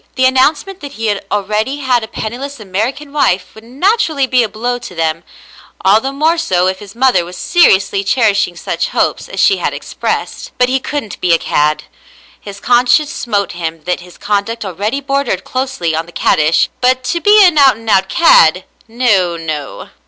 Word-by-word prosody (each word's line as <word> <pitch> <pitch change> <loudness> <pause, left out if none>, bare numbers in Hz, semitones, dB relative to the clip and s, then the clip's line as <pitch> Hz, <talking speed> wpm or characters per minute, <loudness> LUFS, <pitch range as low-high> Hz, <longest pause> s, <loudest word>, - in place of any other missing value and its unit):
The 260 - +2
announcement 295 +9 +1
that 285 -1 -9
he 220 -4 -1 0.2
already 210 +6 -1
had 255 -4 0
a - - -6
penniless 245 +5 -6
American 225 +9 -4
wife 185 -11 0
would 220 - -14
naturally 300 - 0
be 255 -1 +2
a 225 - -1
blow 240 +4 -3
to 210 -7 -10
them, 165 0 -2 0.6
all 205 +3 +5
the 270 - -3
more 315 +4 +1
so 180 - +1
if 185 0 -1
his 205 0 -12
mother 245 -8 +2
was 175 +1 -10
seriously 200 - +2
cherishing 210 -4 +1
such - - -3
hopes - - 0
as - - -6
she 390 - +4
had - - -2
expressed; - - -4
but 250 0 +2
he 265 +1 +1
couldn't 265 -5 -5
be 175 -2 +2
a - - +5
cad. 150 -1 0 0.6
His 200 -1 -10
conscience 245 +6 +2
smote 205 -5 -2
him 165 -2 -6
that 180 +2 -2
his 180 0 -14
conduct 210 +2 -2
already 205 +9 -3
bordered 275 -8 -2
closely 255 -12 -2
on 165 +1 -3
the - - -13
caddish, 155 -1 +2
but 255 0 +2
to 340 +6 -2
be 415 +1 +6
an 330 -5 +3
out 270 -5 +5
and 225 0 -14
out 190 -2 +2
cad, 475 +9 +5 0.2
— - - -31
no, 210 -8 +1
no. 155 -4 -6
225 Hz, 190 wpm, -14 LUFS, 190-270 Hz, 0.6 s, be